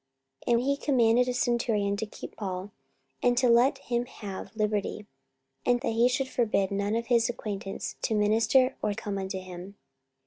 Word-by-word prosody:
44:024:023 - - +2
And 235 - +2
he 280 +1 +1
commanded 250 -4 +3
a 250 - 0
centurion 230 -5 +1
to 220 - -2
keep - - -10
Paul, 190 -1 -5 0.5
and 245 0 +3
to 255 0 +4
let 245 +4 +5
him 245 -2 -2
have 200 -2 -8
liberty, 210 -1 -1 0.6
and 245 0 +3
that - - -1
he 235 +2 +4
should 260 +1 0
forbid 215 -6 +1
none 200 +2 0
of 230 0 -1
his 235 -1 +3
acquaintance 200 -4 -5
to 220 - 0
minister 225 +5 +3
or 210 -1 0
come 205 -2 -4
unto 190 0 -3
him. 185 +1 -9
225 Hz, 175 wpm, -28 LUFS, 200-245 Hz, 0.6 s, let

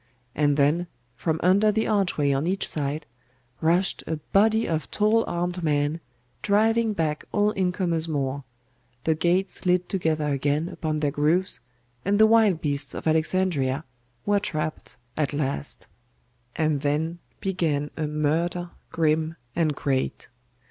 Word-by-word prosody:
And 145 -1 +2
then, 155 +5 +2 0.3
from 160 +5 -1
under 200 +4 +5
the 220 +1 0
archway 185 -9 +1
on 140 +4 0
each 195 +2 0
side, 150 +1 -2 0.6
rushed 175 +4 +2
a 160 - -1
body 215 +8 +2
of 160 -1 -2
tall 220 +2 +3
armed 175 +1 -2
men, 150 0 +1 0.4
driving 220 +2 +3
back 155 -5 -1
all 205 0 +2
incomers 180 -4 0
more; 140 -2 -2 0.6
the 160 - +3
gates 180 +4 +1
slid 180 0 +1
together 160 -5 0
again 145 +4 0
upon 155 -3 -3
their 145 -2 +1
grooves 160 +6 +1 0.4
and 200 +1 +2
the 220 - +7
wild 220 -6 +4
beasts 140 -3 -1
of - - -6
Alexandria 160 -3 +1 0.4
were 205 0 +3
trapped 155 -7 -3 0.2
at 150 -2 -1
last. 145 0 -2 0.7
And 155 -3 +1
then 155 +4 -1 0.2
began 160 -7 -1
a 155 -2 -2
murder 165 +4 -1 0.2
grim 160 0 +1 0.2
and 160 -4 +1
great. 135 -2 -2
160 Hz, 135 wpm, -25 LUFS, 150-185 Hz, 0.7 s, the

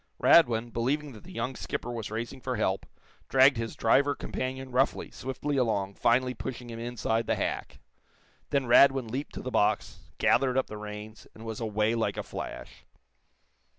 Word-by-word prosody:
Radwin, 120 -7 +5
believing 140 +5 -1
that 110 - -13
the 185 - -11
young 130 -7 -3
skipper 120 - -4
was 115 -3 -5
racing 115 +4 -5
for - - -2
help, - - -1 0.4
dragged 135 0 +6
his 115 -1 -4
driver 140 +5 +3
companion 130 0 -4
roughly, 130 +3 +1
swiftly 140 +2 -3
along, 105 -6 0
finally 125 +4 +2
pushing 125 -2 -6
him 115 - -7
inside 115 -1 -1
the - - +2
hack. - - -3 0.7
Then 140 -2 +1
Radwin 135 0 +5
leaped 135 +6 -5
to - - -6
the 130 - -4
box, 105 - +1 0.2
gathered 130 -1 +3
up 130 - +2
the 105 - -8
reins, 105 +1 -8
and 110 - -11
was 110 -1 -5
away 110 0 +1
like 115 -1 -1
a - - -2
flash. - - -8
120 Hz, 170 wpm, -29 LUFS, 115-130 Hz, 0.7 s, dragged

